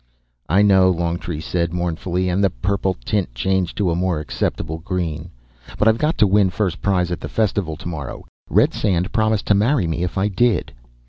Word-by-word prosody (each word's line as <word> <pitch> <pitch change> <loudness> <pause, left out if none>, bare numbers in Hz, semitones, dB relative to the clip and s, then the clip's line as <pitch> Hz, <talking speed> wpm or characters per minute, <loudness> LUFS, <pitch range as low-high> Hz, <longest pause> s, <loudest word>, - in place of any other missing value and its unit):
"I 95 +5 +4
know," 95 -2 +5
Longtree 85 -2 -2
said 85 +1 -2
mournfully, 90 +1 -1
and 90 +3 +1
the 100 - +4
purple 95 +7 -1
tint 95 - -1
changed 95 +6 -1
to 95 -4 +1
a - - 0
more 90 -2 0
acceptable 80 +2 -3
green. 85 -2 -3 0.5
"But 105 - +2
I've 110 +1 +4
got 155 +2 0
to - - +5
win 100 -1 +3
first 90 -2 -2
prize 90 -3 +1
at 90 - -2
the - - -6
festival 100 -7 0
tomorrow; 75 -6 -6 0.2
Redsand 90 -3 +2
promised 110 -1 +1
to - - +3
marry 110 +2 +2
me 80 +1 -2
if 90 +2 -3
I 95 +2 +2
did." 115 +3 +1
90 Hz, 185 wpm, -20 LUFS, 85-100 Hz, 0.5 s, know